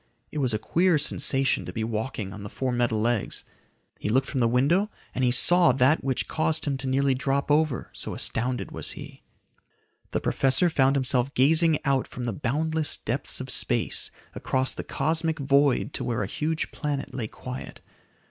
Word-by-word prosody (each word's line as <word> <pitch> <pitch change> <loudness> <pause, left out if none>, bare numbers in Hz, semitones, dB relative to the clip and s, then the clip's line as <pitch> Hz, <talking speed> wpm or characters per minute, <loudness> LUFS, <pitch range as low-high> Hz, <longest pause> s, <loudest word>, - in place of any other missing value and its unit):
It 155 - -4
was 130 -3 +2
a 110 - +1
queer 170 - +2
sensation 135 -2 +2
to - - -7
be 110 - -3
walking 110 -2 -4
on 105 - -9
the 100 - -7
four 130 +3 -2
metal 120 -2 0
legs. 115 0 -1 0.6
He - - -3
looked 130 +5 +2
from 135 - -3
the 120 - +3
window 145 - +2 0.2
and 130 - -1
he 125 - +4
saw 175 +8 +6
that 135 +5 +3
which 130 -1 -1
caused 160 0 0
him 145 -2 0
to 135 0 -5
nearly 135 +1 +2
drop 135 +2 -1
over, 150 -4 +1
so - - -4
astounded 125 +2 -2
was - - -2
he. - - -11 0.9
The - - -1
professor 140 +6 +2
found 135 -2 +3
himself 130 -1 +1
gazing 160 +4 +4
out 135 -2 +1
from 125 - -7
the 120 -2 -2
boundless 155 +6 -1
depths - - -2
of - - -4
space - - +1 0.2
across 130 0 +1
the - - -5
cosmic 160 +2 0
void 140 -2 +2
to - - -3
where 115 -3 -1
a - - -1
huge 155 +10 -2
planet 145 -2 -4
lay 120 -4 -3
quiet. 125 +3 -8
135 Hz, 185 wpm, -26 LUFS, 125-150 Hz, 0.9 s, saw